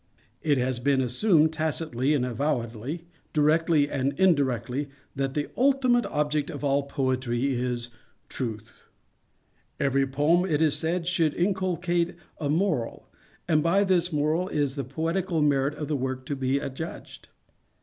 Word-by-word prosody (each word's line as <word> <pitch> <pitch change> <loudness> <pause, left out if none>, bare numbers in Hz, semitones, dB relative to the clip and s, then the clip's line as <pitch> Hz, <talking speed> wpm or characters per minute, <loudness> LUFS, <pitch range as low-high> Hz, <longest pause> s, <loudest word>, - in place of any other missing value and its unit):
_It 150 -4 +3
has 125 -1 0
been 135 +2 +2
assumed, 155 - +3
tacitly 155 -3 0
and 130 -3 +1
avowedly, 125 +3 -2 0.3
directly 155 0 +3
and 140 +2 -2
indirectly, 140 - +1 0.3
that 135 0 -2
the 145 -1 -1
ultimate 255 -2 +3
object 150 0 -1
of - - -6
all 140 0 +2
Poetry 130 -2 -1
is 120 -1 -2 0.4
Truth. 110 -3 -6 0.9
Every 135 0 +2
poem, 150 +6 +2
it 150 -2 +2
is 155 -2 +3
said, 165 +2 -1
should 165 -4 +1
inculcate 175 -2 0 0.2
a 145 - -2
morals 155 - 0 0.4
and 155 -3 +3
by 175 +5 +3
this 180 -2 +2
moral 155 +4 +1
is 145 -6 0
the 140 - -2
poetical 165 +6 -1
merit 145 -1 +2
of 150 -1 -5
the 150 - -1
work 130 -1 -3
to 145 - -3
be 135 0 0
adjudged. 140 +4 -7
145 Hz, 140 wpm, -26 LUFS, 130-165 Hz, 0.9 s, It